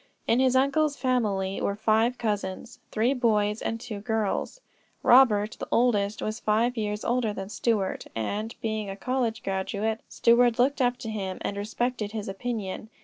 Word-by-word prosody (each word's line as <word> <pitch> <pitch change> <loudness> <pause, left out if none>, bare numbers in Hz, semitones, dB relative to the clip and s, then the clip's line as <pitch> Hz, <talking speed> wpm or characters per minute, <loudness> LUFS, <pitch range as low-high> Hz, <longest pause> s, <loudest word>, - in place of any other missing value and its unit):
In 235 - +3
his 260 -1 +3
uncle's 285 +3 +2
family 210 -7 0
were 200 - 0
five 220 +3 +2
cousins, 205 -2 -3
three 230 +5 +1
boys 215 -4 +1
and 225 - -2
two 225 -3 -6
girls. 220 - -2 0.4
Robert, 220 -4 +5
the - - -5
oldest, 215 -4 +2
was 215 +2 -3
five 230 +4 +1
years 210 -2 -3
older 240 -3 +1
than 195 -1 -6
Stuart, 215 -3 -1
and, 210 - -3
being 215 -2 -2
a 195 - -5
college 235 -1 -2
graduate, 200 +3 -2
Stuart 235 0 +4
looked 265 +3 +2
up 245 0 +2
to 240 -2 -6
him 190 -3 -4
and 200 - -3
respected 215 +1 -2
his 215 -2 -4
opinion. 210 0 -4
220 Hz, 160 wpm, -27 LUFS, 205-245 Hz, 0.4 s, Robert